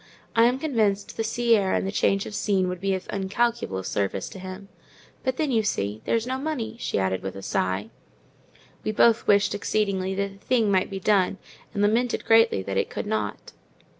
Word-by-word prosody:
I 230 0 +6
am 250 +2 +3
convinced 220 -9 0
the 225 - -1
sea 235 +1 +2
air 195 -3 +1
and - - 0
the 195 - -2
change 195 -1 +1
of - - -7
scene 195 -3 +1
would 180 -1 -5
be 195 -1 +1
of 185 - -6
incalculable 200 - -1
service 95 0 -2
to 190 - -10
him. 185 +1 -8 0.6
But 260 -1 -1
then, 305 -3 0
you 225 -3 +3
see, 105 - -2
there's 230 0 +1
no 260 +1 -2
money," 260 -7 -3
she - - -2
added, 95 -1 0
with 95 0 -5
a 95 - -8
sigh. 95 +5 -1 0.9
We 215 - -1
both 230 +1 +4
wished 205 0 +4
exceedingly 195 -2 -1
that 200 0 -3
the - - -28
thing 230 -5 +2
might 185 -1 +2
be 195 - -5
done, 195 -1 +2 0.3
and 205 -2 -1
lamented 230 +4 +1
greatly 225 - +4
that 95 0 -3
it - - 0
could - - -4
not. 215 +1 -3
200 Hz, 200 wpm, -25 LUFS, 185-230 Hz, 0.9 s, I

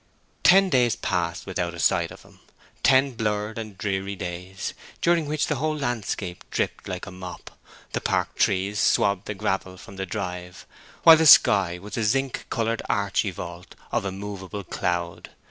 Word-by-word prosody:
Ten 195 0 +6
days 125 -4 +3
passed 85 -1 -2
without 90 -2 -3
a - - -9
sight - - +2
of - - -13
him; - - -20 0.4
ten 135 +1 +4
blurred 105 -1 -2
and 110 -3 -8
dreary 95 0 -2
days, 90 +1 -5 0.3
during 170 -3 +2
which 150 0 0
the 150 - -1
whole 155 +3 -1
landscape 110 -8 -3
dripped - - -2
like 90 -1 -5
a 100 - -9
mop; 90 -1 -9 0.4
the - - -2
park - - 0
trees 100 +2 +1
swabbed 100 -1 +2
the 105 - -3
gravel 95 -2 -2
from 95 +1 -12
the 95 0 -4
drive, 90 -1 -5 0.4
while 165 -1 +10
the 160 0 +4
sky 95 - +7
was 105 +5 -8
a 115 - 0
zinc 135 +4 0
coloured 115 0 -1
archi 100 0 +1
vault 85 -1 -8 0.2
of - - 0
immovable 100 0 -6
cloud. 85 -1 -3
100 Hz, 165 wpm, -25 LUFS, 90-115 Hz, 0.4 s, while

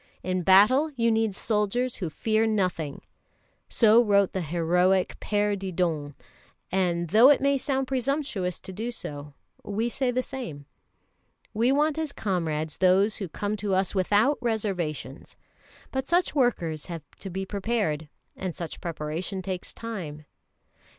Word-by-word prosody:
In 185 0 -1
battle 210 - +5
you 230 -2 +2
need 220 -3 +1
soldiers 225 +4 0
who 180 -5 -3
fear 220 +7 +1
nothing." 180 -9 -1 0.7
So 230 +1 +5
wrote 200 -3 +3
the 190 - -1
heroic 180 +3 +1
Père 205 0 0
Didon; 170 -7 -2 0.6
and, 175 -2 0
though 225 - +7
it 290 - +5
may 280 +1 +2
sound 270 0 0
presumptuous 260 - -2
to 190 - -8
do 225 +5 -4
so, 145 -10 -8 0.3
we 220 +4 -1
say 260 +1 0
the 255 +1 0
same. 170 - -7 0.9
We 235 +4 +2
want 300 +2 +2
as 310 -3 -2
comrades 160 -6 -2
those 190 +3 +4
who 195 -5 -5
come 205 +5 -3
to 200 -1 -1
us 190 0 +1
without 205 +8 +2
reservations. 190 - -3 0.5
But 265 0 -2
such 350 +2 +2
workers 175 - 0
have 165 -4 -6 0.2
to 195 - -6
be 190 +1 -4
prepared, 195 -7 -2 0.3
and 185 -3 -4
such 170 -3 -6
preparation 170 +3 -4
takes 185 -1 -4
time. 170 -10 -6
195 Hz, 145 wpm, -26 LUFS, 175-235 Hz, 0.9 s, though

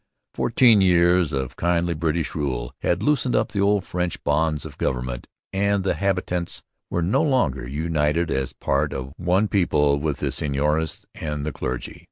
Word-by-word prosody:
Fourteen 115 -3 +4
years 90 -2 +4
of 65 -3 -3
kindly 85 0 +1
British 80 +1 -1
rule 65 -6 -3
had 85 - 0
loosened 140 -4 +2
the 110 -2 0
old 100 -1 +2
French 90 -1 -3
bonds 75 +1 +1
of 75 -3 -10
government 60 -1 -2 0.3
and 100 0 +1
the 95 - +1
habitants 90 -3 -2 0.3
were 85 - -1
no 90 - +2
longer 125 - +1
united 80 +2 0
as 65 0 -1
part 75 +2 -1
of 65 0 -5
one 90 +4 +2
people 75 -8 +2
with 75 -2 -1
the - - -2
seigneurs 75 +3 -1
and 75 -2 -4
the 75 - -2
clergy. 65 -2 -5
80 Hz, 160 wpm, -23 LUFS, 70-90 Hz, 0.3 s, Fourteen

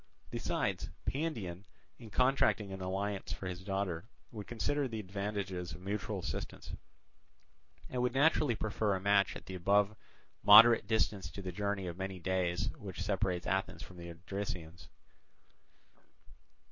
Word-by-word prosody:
Besides, - - -1 0.2
Pandion 110 - -2 0.4
in 115 -3 -10
contracting 125 -5 +2
an 95 - -6
alliance 95 +1 -2
for - - -7
his 90 0 -5
daughter 95 -4 -2 0.3
would 105 -4 -7
consider 135 +5 0
the 115 -3 -4
advantages 100 -3 -3
of 90 - -10
mutual 105 +2 -3
assistance, 85 -4 -5 1.2
and 125 - -2
would 125 +1 0
naturally 145 -3 +4
prefer 105 -1 0
a - - -2
match 100 0 +3
at - - -9
the 95 - -7
above 100 +3 +3 0.5
moderate 115 +3 +9
distance 105 -4 +1
to 95 +3 -8
the 90 - -3
journey 100 +1 -2
of 85 -1 -5
many 95 0 -3
days 95 +4 0
which 95 -3 -6
separates 95 -2 0
Athens 95 +1 -1
from 90 - -12
the 85 0 -8
Odrysians. 90 -1 -6
100 Hz, 140 wpm, -34 LUFS, 90-105 Hz, 1.2 s, moderate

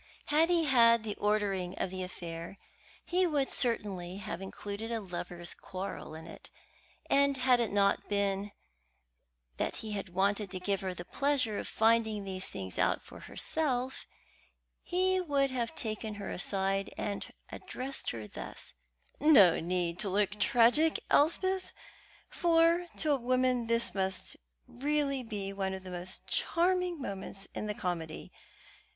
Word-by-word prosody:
Had 310 +3 +4
he 345 -2 +3
had 235 -5 +5
the 215 -2 -3
ordering 200 -3 0
of 185 - -2
the 185 0 -4
affair, 170 0 -6 0.5
he 360 +1 +2
would 285 -4 0
certainly 195 -7 -2
have 195 -2 -5
included 205 +3 -6
a 230 - 0
lovers' 175 -3 -3
quarrel 185 -4 -6
in 160 0 -9
it, 165 - -11 0.6
and 280 0 +3
had 255 -1 +4
it 235 -3 0
not 200 0 +2
been 200 0 0 1.1
that - - -1
he 215 -1 -3
wanted 200 +3 +1
to 185 0 -5
give 195 +1 -1
her 185 -1 -3
the 175 - -7
pleasure 270 -4 0
of - - -5
finding 220 -2 +2
these 190 -1 -3
things 95 -2 -6
out - - +2
for - - -12
herself, 265 -5 +1 0.7
he 370 +1 +1
would 280 -5 +1
have 240 -3 -2
taken 215 -1 -3
her 205 -1 -5
aside 195 +1 0
and 205 -1 -3 0.2
addressed 270 +2 -4
her 110 -2 -5
thus: - - -8 0.5
"No 255 - +7
need 175 0 -1
to 205 - -1
look 205 +2 0
tragic, 245 +9 +4
Elspeth; 375 +5 +2 0.6
for 335 0 +3
to 310 - +1
a 285 - +4
woman 255 -1 +1
this 230 0 +2
must 190 -1 -2
be - - -25 0.4
really 265 -9 0
one 190 -1 -2
of 190 - -9
the 185 - -8
most 180 +1 -5
charming 360 0 +1
moments 195 -4 -6
in 215 - -3
the 210 - -2
comedy. 170 -5 -4
210 Hz, 145 wpm, -31 LUFS, 190-270 Hz, 1.1 s, No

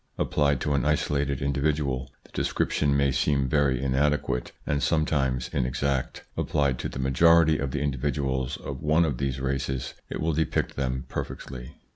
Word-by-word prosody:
Applied 70 -2 +1
to 75 - 0
an 70 - +1
isolated 70 -2 0
individual, 70 -2 0
the - - -21
description 70 -1 +1
may 70 -1 +3
seem 70 +1 +1
very 70 -2 +2
inadequate 70 -1 0
and 70 -1 0
sometimes 70 -6 +1
inexact; 65 0 -1
applied 70 -4 0
to - - -3
the - - -7
majority 80 +4 +4
of 70 - -1
the 70 +1 -2
individuals 65 -2 -1
of 70 -1 -7
one 80 +2 +3
of 70 -6 -2
these 70 -1 -1
races 65 0 -2 0.2
it - - -4
will 80 0 0
depict 80 +1 0
them 65 -1 -2
perfectly. 60 -2 -6
70 Hz, 155 wpm, -26 LUFS, 65-75 Hz, 0.2 s, majority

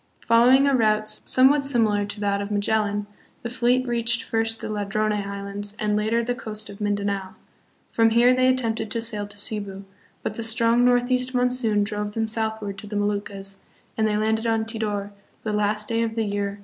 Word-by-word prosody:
Following 245 +4 +5
a 280 -1 +3
route 215 -2 +2 0.2
somewhat 275 +3 +5
similar 220 -7 +2
to 205 +1 -7
that 200 -1 0
of 200 - -5
Magellan, 205 0 0 0.4
the 235 - -4
fleet 250 +1 +1
reached 235 +1 0
first 225 -2 -1
the - - -6
Ladrone 215 0 -1
Islands 200 0 -4
and 210 -1 0
later 220 +3 +1
the 245 +1 -1
coast 215 -3 -7
of 200 - -12
Mindanao. 200 -2 -2 0.6
From 225 0 +3
here 240 +2 +5
they 255 0 +3
attempted 230 -4 0
to 230 - -1
sail 215 -3 -1
to 205 0 -13
Cebu, 200 -2 -2 0.4
but - - -2
the 230 - -5
strong 230 +1 +3
northeast 250 +1 +2
monsoon 245 -4 +1
drove 210 0 -3
them 225 -1 0
southward 220 -2 -2
to 210 - -10
the 210 - -6
Mo 205 0 +1
luccas, 195 -1 -4 0.4
and 220 -1 +1
they 210 -1 0
landed 220 +1 0
on 225 -1 +1
Tidor 210 -3 -3 0.3
the 215 - -2
last 210 0 0
day 230 0 0
of 225 -1 -2
the 225 - 0
year 200 -1 -3
1526. - - -21
220 Hz, 195 wpm, -24 LUFS, 205-235 Hz, 0.6 s, Following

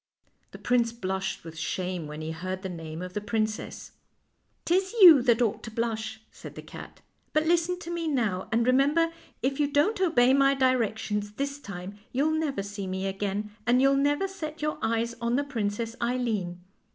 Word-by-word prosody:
'" - - -41
The - - -9
prince 240 -2 +1
blushed 190 -4 -3
with 165 -1 -9
shame 180 +1 -3
when 150 +1 -7
he 155 +1 -4
heard 185 +4 -5
the 190 - -3
name 165 -1 -6
of 180 0 -7
the 210 - -2
princess. 215 +1 -3 0.4
" - - -46
'Tis 380 +4 +1
you 335 -9 +10
that 240 -1 +3
ought 220 - -1
to - - -7
blush," 220 -1 -3
said - - -11
the - - -8
cat; - - -11 0.2
" - - -43
but 310 +1 +2
listen 345 +2 +2
to 340 - -6
me 340 -1 -2
now, 220 -11 -1
and 230 +1 +2
remember, 285 +6 +3 0.3
if 270 +2 0
you 290 - +3
don't 315 +9 +2
obey 265 -8 +4
my 275 0 +4
directions 220 -5 0
this 280 +4 -3
time 200 -3 -8
you'll 285 +5 +1
never 300 -9 -1
see 200 -1 -6
me 190 +1 -3
again, 200 +2 -2 0.2
and 245 +1 +5
you'll 275 +1 +4
never 290 +7 +2
set 315 -5 -7
your 305 0 -2
eyes 230 +1 0
on 235 +1 +1
the 285 - +1
Princess 230 -4 -3
Eileen. 225 -8 -1
235 Hz, 195 wpm, -27 LUFS, 200-280 Hz, 0.4 s, you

